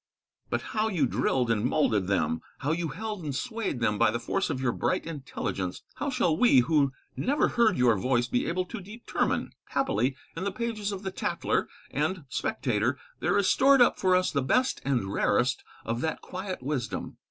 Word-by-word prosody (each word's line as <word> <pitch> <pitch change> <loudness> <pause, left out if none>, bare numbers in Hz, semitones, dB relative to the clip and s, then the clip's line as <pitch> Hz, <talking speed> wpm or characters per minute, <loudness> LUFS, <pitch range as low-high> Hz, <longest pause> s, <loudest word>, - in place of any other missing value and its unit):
But - - 0
how 215 0 +2
you 175 -10 +2
drilled 125 +1 +1
and 110 -2 +1
moulded 110 -8 +2
them, 95 -4 +1 0.2
how 145 - 0
you 165 +1 0
held 205 +5 -5
and 145 -3 -3
swayed 225 - -2
them 105 -2 +1
by - - +5
the 115 +2 -1
force 190 +11 -1
of 140 -4 -2
your 130 -2 +1
bright 120 - -1
intelligence, 130 - -4
how 285 - -1
shall 235 - +2
we 160 - +6
who 140 +1 +2 0.2
never 285 +5 +2
heard 225 -5 +3
your 125 -3 +4
voice 120 +4 +1
be 120 - 0
able 180 +2 0
to 230 +2 -7
determine? 215 +5 -2
Happily 265 - 0 0.2
in 165 - -4
the 200 - -1
pages 215 -1 -3
of 195 0 -5
the 190 - -3
'Tatler' - - -1 0.2
and 155 +4 -1
'Spectator' 125 -1 0 0.2
there - - +2
is 200 -2 +3
stored 275 +5 +5
up 245 - +5
for 185 -1 +4
us 185 0 +2
the 140 - +1
best 255 - +1
and 120 -8 0
rarest 125 +7 +2 0.2
of 115 +2 -2
that 160 - -2
quiet 185 -5 -6
wisdom. 135 -3 -3
155 Hz, 190 wpm, -28 LUFS, 125-200 Hz, 0.2 s, we